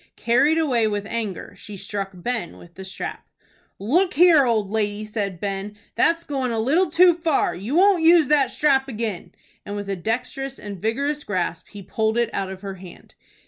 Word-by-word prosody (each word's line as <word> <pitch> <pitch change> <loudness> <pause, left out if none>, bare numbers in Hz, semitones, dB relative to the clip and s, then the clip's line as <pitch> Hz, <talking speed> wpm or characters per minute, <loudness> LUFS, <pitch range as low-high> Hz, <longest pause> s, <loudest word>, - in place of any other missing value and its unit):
Carried 275 +7 +3
away 250 -9 +2
with 205 -1 -2
anger, 220 -3 -5
she 205 -1 -10
struck 200 0 -4
Ben 190 0 -4
with 170 -1 -15
the 190 - -9
strap. 190 0 -6 0.5
"Look 350 - +1
here, 325 -5 +6
old 215 -4 0
lady," 210 -1 -1
said 205 -4 -4
Ben, 200 +1 -4 0.2
"that's 335 0 +2
goin' 265 -4 -2
a 225 - -1
little 315 +11 +2
too 350 +2 +6
far. 325 -3 0
You 205 - -4
won't 380 0 +5
use 325 -2 +6
that 290 -3 +3
strap 270 -3 +2
again;" 220 -6 -4 0.3
and 205 - -6
with 205 -1 -5
a 195 - -1
dexterous 250 +7 -3
and 200 -4 -8
vigorous 280 +7 -1
grasp 175 -4 -3
he 205 -2 -10
pulled 220 +3 -1
it 235 -1 +1
out 195 -1 -2
of 190 0 -8
her 195 -1 -5
hand. 185 -2 -13
225 Hz, 185 wpm, -23 LUFS, 200-285 Hz, 0.5 s, here